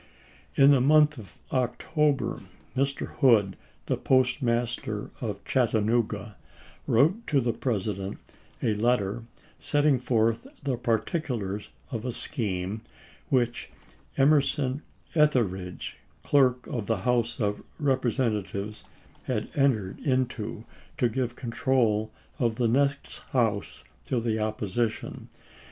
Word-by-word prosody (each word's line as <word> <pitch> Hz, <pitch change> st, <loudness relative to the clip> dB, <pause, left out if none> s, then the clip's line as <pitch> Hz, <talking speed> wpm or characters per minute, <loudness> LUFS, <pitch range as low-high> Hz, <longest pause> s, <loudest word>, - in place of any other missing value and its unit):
In 140 Hz, +1 st, +7 dB
the 135 Hz, -3 st, +5 dB
month 150 Hz, 0 st, +5 dB
of 100 Hz, -6 st, -13 dB, 0.2 s
October 145 Hz, +3 st, 0 dB, 0.3 s
Mr. 135 Hz, +1 st, -1 dB
Hood, 110 Hz, -9 st, +4 dB, 0.3 s
the -, -, 0 dB
postmaster 120 Hz, -4 st, +1 dB
at 105 Hz, -4 st, -4 dB
Chattanooga, 110 Hz, -3 st, +1 dB, 0.5 s
wrote 165 Hz, -, +3 dB
to 145 Hz, -, +3 dB
the 120 Hz, -2 st, 0 dB
President 100 Hz, -5 st, -2 dB, 0.5 s
a 110 Hz, -, +2 dB
letter 115 Hz, 0 st, 0 dB, 0.3 s
setting 145 Hz, -3 st, +2 dB
forth 115 Hz, -2 st, +1 dB, 0.2 s
the 135 Hz, -3 st, 0 dB
particulars 115 Hz, -, -2 dB, 0.2 s
of 115 Hz, -3 st, -3 dB
a 125 Hz, -, -2 dB
scheme 105 Hz, -5 st, -3 dB, 0.5 s
which 120 Hz, -2 st, +1 dB, 0.5 s
Emerson 140 Hz, -1 st, +3 dB, 0.3 s
Etheridge, 105 Hz, -, +1 dB, 0.3 s
Clerk 130 Hz, -3 st, +3 dB
of 110 Hz, -5 st, -4 dB
the 115 Hz, -, +1 dB
House 120 Hz, 0 st, +1 dB
of 105 Hz, -2 st, 0 dB, 0.2 s
Repre 130 Hz, -4 st, +2 dB
sentatives, 105 Hz, -4 st, -2 dB, 0.4 s
had -, -, -2 dB
entered 115 Hz, -9 st, +1 dB
into 120 Hz, -5 st, -1 dB, 0.3 s
to 125 Hz, -6 st, +2 dB
give 125 Hz, +1 st, -2 dB
control 115 Hz, -4 st, +1 dB, 0.3 s
of 115 Hz, -3 st, +1 dB
the 120 Hz, 0 st, +1 dB
next 140 Hz, +4 st, +1 dB
House 110 Hz, -6 st, 0 dB, 0.2 s
to 125 Hz, -, 0 dB
the 110 Hz, -1 st, -1 dB
opposition. 110 Hz, +1 st, -2 dB
120 Hz, 110 wpm, -27 LUFS, 110-135 Hz, 0.5 s, In